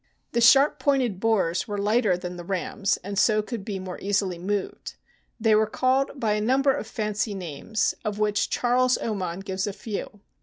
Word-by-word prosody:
The 235 Hz, -, +1 dB
sharp 270 Hz, +5 st, +6 dB
pointed 255 Hz, -9 st, +1 dB
bores 190 Hz, -5 st, +1 dB
were 205 Hz, -1 st, -3 dB
lighter 210 Hz, -1 st, +2 dB
than 180 Hz, 0 st, -6 dB
the 175 Hz, -, -8 dB
rams, 195 Hz, +2 st, -1 dB
and 200 Hz, +1 st, -2 dB
so 215 Hz, -1 st, +3 dB
could 225 Hz, -2 st, -6 dB
be 200 Hz, -1 st, -4 dB
more 185 Hz, -1 st, -7 dB
easily 195 Hz, -3 st, 0 dB
moved. 200 Hz, +2 st, -4 dB, 0.4 s
They 220 Hz, -1 st, +3 dB
were 215 Hz, 0 st, +4 dB
called 265 Hz, +4 st, 0 dB
by 220 Hz, -3 st, +1 dB
a 210 Hz, -, 0 dB
number 265 Hz, +5 st, +3 dB
of 215 Hz, -, -5 dB
fancy 210 Hz, -1 st, -2 dB
names, 185 Hz, +4 st, -2 dB
of 210 Hz, -2 st, -3 dB
which 210 Hz, -1 st, +1 dB
Charles 250 Hz, +1 st, +2 dB
Oman 190 Hz, -5 st, -3 dB
gives 190 Hz, 0 st, -3 dB
a 205 Hz, -, -3 dB
few. 205 Hz, -1 st, -6 dB
210 Hz, 185 wpm, -25 LUFS, 190-230 Hz, 0.4 s, sharp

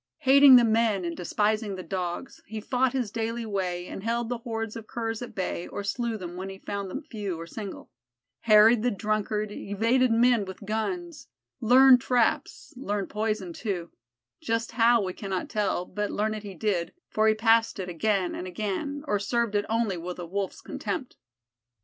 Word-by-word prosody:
Hating 275 Hz, -1 st, +8 dB
the 245 Hz, -, +8 dB
men 220 Hz, -4 st, +2 dB
and 170 Hz, -1 st, -3 dB
despising 210 Hz, +3 st, 0 dB
the 185 Hz, -, -7 dB
Dogs, 180 Hz, +5 st, -4 dB
he 220 Hz, +1 st, -5 dB
fought 255 Hz, +3 st, 0 dB
his 250 Hz, -6 st, -1 dB
daily 230 Hz, +1 st, -3 dB
way 185 Hz, -4 st, -2 dB
and 190 Hz, -, -7 dB
held 230 Hz, +2 st, -1 dB
the 245 Hz, -1 st, -2 dB
hordes 225 Hz, -2 st, -4 dB
of 225 Hz, -1 st, -8 dB
Curs 225 Hz, -1 st, -3 dB
at 245 Hz, -, -8 dB
bay 185 Hz, -2 st, -3 dB
or 205 Hz, -, -5 dB
slew 230 Hz, +2 st, -2 dB
them 175 Hz, -3 st, -7 dB
when 190 Hz, +1 st, -5 dB
he 195 Hz, -, -8 dB
found 200 Hz, 0 st, -5 dB
them 275 Hz, -, -5 dB
few 205 Hz, -9 st, -5 dB
or 165 Hz, -, -6 dB
single; 200 Hz, +3 st, -8 dB, 0.5 s
harried 215 Hz, +1 st, +6 dB
the 245 Hz, -, +2 dB
drunkard, 215 Hz, 0 st, -1 dB
evaded 230 Hz, +6 st, +1 dB
men 235 Hz, -1 st, +4 dB
with 190 Hz, +2 st, -9 dB
guns, 295 Hz, -, -3 dB, 0.3 s
learned 255 Hz, +2 st, +7 dB
traps 245 Hz, -2 st, 0 dB
learned 205 Hz, -6 st, -3 dB
poison, 210 Hz, -4 st, -2 dB
too 180 Hz, -4 st, -4 dB, 0.5 s
just 230 Hz, 0 st, -1 dB
how, 230 Hz, -1 st, +4 dB
we 185 Hz, -1 st, -3 dB
cannot 190 Hz, -2 st, -4 dB
tell, 205 Hz, -4 st, -1 dB
but 210 Hz, +2 st, -3 dB
learn 215 Hz, +1 st, -1 dB
it 215 Hz, -, -5 dB
he 200 Hz, -2 st, -9 dB
did, 180 Hz, -2 st, -1 dB
for 215 Hz, 0 st, +1 dB
he 215 Hz, -, +4 dB
passed 225 Hz, +1 st, +3 dB
it 190 Hz, -2 st, -4 dB
again 185 Hz, +2 st, 0 dB
and 185 Hz, -, -5 dB
again, 215 Hz, -, -3 dB
or 205 Hz, -6 st, +1 dB
served 230 Hz, +2 st, 0 dB
it 205 Hz, 0 st, 0 dB
only 225 Hz, -4 st, 0 dB
with 175 Hz, +1 st, -6 dB
a 175 Hz, -, -6 dB
Wolf's 195 Hz, +3 st, -4 dB
contempt. 255 Hz, -, -5 dB
215 Hz, 185 wpm, -27 LUFS, 195-235 Hz, 0.5 s, Hating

